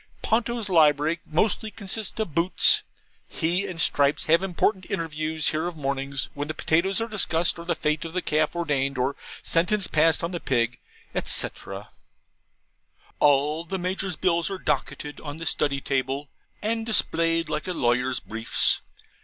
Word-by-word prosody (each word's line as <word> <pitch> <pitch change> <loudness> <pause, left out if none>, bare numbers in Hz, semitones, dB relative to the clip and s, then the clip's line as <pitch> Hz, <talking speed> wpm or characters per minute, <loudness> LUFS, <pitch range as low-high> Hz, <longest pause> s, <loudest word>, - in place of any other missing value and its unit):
Ponto's 230 -1 0
library 155 -2 +3
mostly 210 +7 +1
consists 205 +1 -3
of 215 -8 -2
boots. 170 +3 +3 0.5
He 180 +4 0
and 180 -3 -6
Stripes 145 -1 +3
have 165 +2 +4
important 190 +1 0
interviews 155 -1 -1
here 155 +2 -1
of 175 -2 -6
mornings, 140 -1 -2
when 145 +1 -4
the 155 - -4
potatoes 180 +7 +1
are 225 - -1
discussed, 175 -7 +1
or 170 - -8
the 170 -1 0
fate 150 0 -1
of 165 -1 -7
the 185 - 0
calf 155 +1 +1
ordained, 140 -5 -1
or 130 +3 0 0.3
sentence 185 +4 +2
passed 160 0 +3
on 170 - -2
the 175 - -3
pig, 120 -4 0 0.4
&c.. - - +3 1.7
All 145 +2 +3
the 190 +3 -4
Major's 185 0 -2
bills 170 +1 +1
are 195 - -4
docketed 145 -5 -3
on 145 0 -7
the 165 - -6
Study 140 -3 +1
table 135 +1 -2 0.3
and 225 +1 0
displayed 165 -7 +3
like 150 +2 -3
a - - -1
lawyer's 125 -2 +1
briefs. 115 +1 0
165 Hz, 155 wpm, -25 LUFS, 145-185 Hz, 1.7 s, have